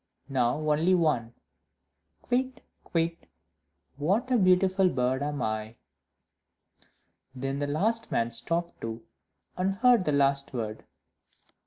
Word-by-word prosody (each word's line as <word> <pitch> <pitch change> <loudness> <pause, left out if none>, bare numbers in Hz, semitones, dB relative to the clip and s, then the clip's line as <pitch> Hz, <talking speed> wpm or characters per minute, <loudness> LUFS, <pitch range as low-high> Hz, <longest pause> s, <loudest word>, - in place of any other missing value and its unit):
now 125 -1 +1
only 160 +5 +3
one. 150 -10 +1 1.0
"Kywitt! 255 0 -1 0.2
Kywitt! 165 -1 -2 0.7
what 200 - 0
a 250 - +5
beautiful 185 0 +4
bird 130 -2 0
am 145 -2 -2
I!" 110 +1 -3 1.6
Then 135 +2 -3
the 145 - -1
last 220 +10 -1
man 115 0 0
stopped 165 +9 -3
too, 115 0 -5 0.5
and 190 +1 0
heard 240 -3 +4
the 150 - +1
last 140 -1 +1
word. 110 -2 -4
150 Hz, 115 wpm, -28 LUFS, 125-185 Hz, 1.6 s, a